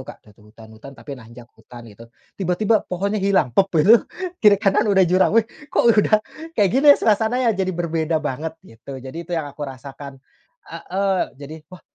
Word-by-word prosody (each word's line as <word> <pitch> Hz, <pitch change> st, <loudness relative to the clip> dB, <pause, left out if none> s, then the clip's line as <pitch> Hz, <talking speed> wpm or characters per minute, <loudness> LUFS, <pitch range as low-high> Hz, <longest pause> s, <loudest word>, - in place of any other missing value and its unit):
Kak, -, -, -12 dB
dah 105 Hz, -, -19 dB
tuh 105 Hz, +1 st, -22 dB
hutan-hutan, 110 Hz, +4 st, -14 dB
tapi 145 Hz, -, -10 dB
nanjak 120 Hz, -1 st, -12 dB
hutan 120 Hz, +1 st, -14 dB
itu, 115 Hz, +1 st, -15 dB, 0.3 s
tiba-tiba 200 Hz, +4 st, +1 dB
pohonnya 200 Hz, +3 st, -2 dB
hilang, 190 Hz, -11 st, +1 dB
pop 195 Hz, +9 st, +2 dB
gitu, 215 Hz, +10 st, +6 dB, 0.4 s
kiri 210 Hz, -2 st, +6 dB
kanan 200 Hz, +1 st, +1 dB
udah 190 Hz, -2 st, +4 dB
jurang, 185 Hz, +5 st, +2 dB
weh, 225 Hz, -, +4 dB, 0.2 s
kok -, -, 0 dB
udah 215 Hz, +1 st, +2 dB, 0.3 s
kayak 205 Hz, -3 st, +3 dB
gini 275 Hz, +3 st, +3 dB
suasananya 225 Hz, +3 st, +1 dB
jadi 190 Hz, -1 st, -2 dB
berbeda 165 Hz, -1 st, -1 dB
banget, 155 Hz, +2 st, -5 dB
gitu. 135 Hz, 0 st, -11 dB
Jadi 155 Hz, +7 st, -9 dB
itu -, -, -6 dB
yang 160 Hz, -, -2 dB
aku 145 Hz, +1 st, -13 dB
rasakan 135 Hz, +1 st, -11 dB, 0.5 s
heeh, 195 Hz, 0 st, -2 dB, 0.2 s
jadi, 145 Hz, +3 st, -10 dB
"Wah 185 Hz, -, -13 dB
170 Hz, 175 wpm, -20 LUFS, 135-200 Hz, 0.5 s, gitu